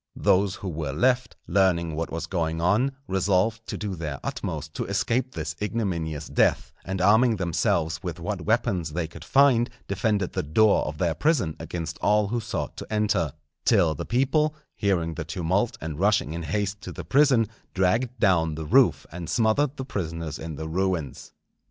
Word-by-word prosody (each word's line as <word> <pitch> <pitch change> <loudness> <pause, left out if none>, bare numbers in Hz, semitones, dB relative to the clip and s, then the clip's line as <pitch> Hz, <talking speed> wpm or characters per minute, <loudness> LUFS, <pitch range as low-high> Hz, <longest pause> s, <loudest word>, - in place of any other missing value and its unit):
Those 95 0 +2
who 100 - -7
were 75 -5 -3
left, 125 - +1
learning 85 -4 +2
what 80 +1 -3
was 80 0 -3
going 80 -2 -2
on, 105 +11 +2
resolved 100 +4 +1
to - - -4
do 105 -2 -3
their 75 -5 -5
utmost - - -4
to - - -3
escape 115 +6 0
this 80 -1 -4
ignominious 85 -9 -2
death, - - +1
and 95 +1 -4
arming 110 +5 +5
themselves 80 -3 0
with 90 -2 -5
what 100 +2 -3
weapons 100 -8 0
they 85 -1 -1
could 80 0 -11
find, 130 +1 +4 0.2
defended 100 -1 0
the - - 0
door 100 +9 +3
of 75 0 -5
their 85 -1 +1
prison 125 - +1
against 85 0 -5
all 105 -1 +2
who 120 +2 0
sought 100 -10 -4
to - - -8
enter; 100 -8 +1 0.3
till 90 -9 +4
the 70 - -5
people, 150 +5 +1 0.2
hearing 85 -5 0
the 80 - -4
tumult 90 +7 -1
and 80 -1 -5
rushing 100 -5 +2
in 85 - -4
haste 100 +5 -2
to - - -7
the 85 - -8
prison, 130 - +4 0.3
dragged 115 +6 +1
down 85 -7 +3
the 80 0 -5
roof, - - +4
and 85 -1 -6
smothered 130 +6 +2
the 130 - -4
prisoners 80 - -4
in 80 -1 -6
the 80 +2 -5
ruins. 85 -5 -2
95 Hz, 175 wpm, -25 LUFS, 80-110 Hz, 0.3 s, arming